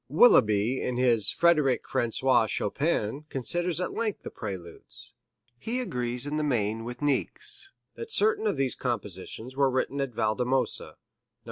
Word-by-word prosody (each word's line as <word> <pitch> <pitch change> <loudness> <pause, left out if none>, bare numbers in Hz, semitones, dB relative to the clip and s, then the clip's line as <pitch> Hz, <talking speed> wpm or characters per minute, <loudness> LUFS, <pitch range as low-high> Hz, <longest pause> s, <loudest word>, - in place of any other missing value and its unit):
Willeby 115 - +4
in 125 -1 -2
his 115 -5 +3
"Frederic 155 -7 +2
Francois 120 0 +2
Chopin" 140 +3 -1
considers 175 +6 0
at 180 - -2
length 220 -3 -2
the - - -7
Preludes. 95 -1 -8 0.5
He 240 +3 -3
agrees 125 - -2
in 145 +1 -2
the 155 - 0
main 115 -5 -1
with 120 +4 -7
Niecks, 145 - -2 0.2
that 460 - -8
certain 440 0 +4
of - - 0
these 135 -2 +1
compositions 115 +1 -5
were 135 -1 +3
written 130 +2 -1
at 135 - -1
Valdemosa 125 +4 +1
Nos. - - -15
130 Hz, 145 wpm, -27 LUFS, 115-155 Hz, 0.5 s, Willeby